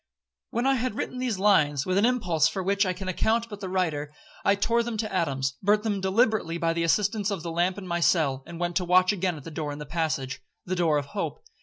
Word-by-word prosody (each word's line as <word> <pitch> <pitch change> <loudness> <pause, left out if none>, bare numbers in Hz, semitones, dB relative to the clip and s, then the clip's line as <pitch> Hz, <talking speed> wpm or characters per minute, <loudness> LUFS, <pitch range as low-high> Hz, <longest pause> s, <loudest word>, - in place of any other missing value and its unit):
'When 235 +3 -1
I 270 - +4
had 250 -2 -2
written 250 - -4
these 250 -5 -1
lines, 150 -8 +3
with 185 - 0
an 205 +4 +4
impulse 180 -11 +2
for 190 +3 -3
which 200 +1 +2
all 185 - 0
can 190 +1 -7
account 225 +5 0
but 205 -2 -8
the 190 -2 -5
writer, 160 -6 -1 0.3
I 200 - +4
tore 230 +4 +2
them 235 -1 -3
to 215 -2 -3
atoms, 135 -7 0
burnt 210 +2 +3
them 205 -3 -1
deliberately 190 -3 +1
by 165 -1 0
the 170 - -1
assistance 205 +5 +1
of 195 -6 -3
the 170 - -4
lamp 175 +3 0
in 200 - -7
my 170 -1 -1
cell, 150 -6 +2
and 170 -1 -8
went 175 0 -2
to 185 - 0
watch 185 +2 +4
again 185 -3 -1
at 145 - -11
the 165 - -8
door 150 -1 -3
in 145 - -6
the 150 - -7
passage—the 155 +2 -3
door 165 -4 +2
of 145 - -2
hope. 140 - -4
185 Hz, 250 wpm, -26 LUFS, 165-205 Hz, 0.3 s, I